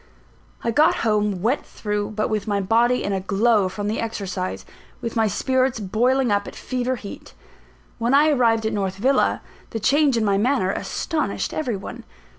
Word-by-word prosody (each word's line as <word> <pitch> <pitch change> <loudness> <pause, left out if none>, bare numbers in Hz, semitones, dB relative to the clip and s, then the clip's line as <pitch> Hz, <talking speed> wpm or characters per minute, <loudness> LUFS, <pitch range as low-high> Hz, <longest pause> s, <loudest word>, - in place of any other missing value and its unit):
I 235 - 0
got 310 +8 +4
home 210 -4 +1
wet 245 +6 +1
through; 210 0 -4
but 215 - 0
with 215 -2 -2
my 205 -1 +1
body 230 +5 +2
in 200 - -1
a 190 - 0
glow 200 +1 +2
from 205 +2 -4
the 215 - -1
exercise, 195 -4 -4 0.3
with 230 - -5
my 225 -1 +3
spirits 260 +4 0
boiling 240 +5 +1
up 200 0 +1
at - - -9
fever 255 0 -2
heat. 205 -4 -10 0.6
When 235 +4 +2
I 300 +2 +5
arrived 230 -5 +2
at 220 - 0
North 195 -2 -1
Villa, 260 +8 +1 0.3
the 225 - -4
change 275 +3 +3
in 220 - +1
my 200 -1 +2
manner 235 -4 +1
astonished 315 - -2
every 250 -9 -2
one. 235 +5 -8
225 Hz, 180 wpm, -22 LUFS, 205-250 Hz, 0.6 s, I